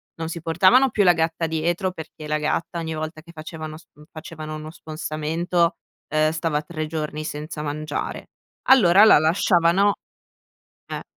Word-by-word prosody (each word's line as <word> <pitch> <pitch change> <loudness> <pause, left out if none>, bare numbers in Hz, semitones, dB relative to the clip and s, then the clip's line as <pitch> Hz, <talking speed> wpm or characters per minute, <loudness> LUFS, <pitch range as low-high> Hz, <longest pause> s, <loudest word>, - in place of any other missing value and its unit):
non 165 -1 -5
si 170 0 -6
portavano 185 +11 +4
più 210 -2 +2
la 180 - +7
gatta 165 0 -1
dietro, 170 +4 -1
perché 160 -3 -10
la 150 0 0
gatta 165 +3 -2
ogni 160 -1 -4
volta 155 0 -5
che 170 +1 -16
facevano 155 0 -8
s - - -16 0.3
facevano 155 -1 -8
uno 155 +1 -8
spostamento, 165 +2 -2 0.3
ehm, 155 0 +2
stava 160 -2 -1
3 155 0 -5
giorni 155 -1 -4
senza 150 +1 -6
mangiare. 150 0 -4 0.4
Allora 205 -6 +7
la 220 - +8
lasciavano 175 +4 +3 0.9
eh. - - -5
160 Hz, 150 wpm, -23 LUFS, 155-170 Hz, 0.9 s, la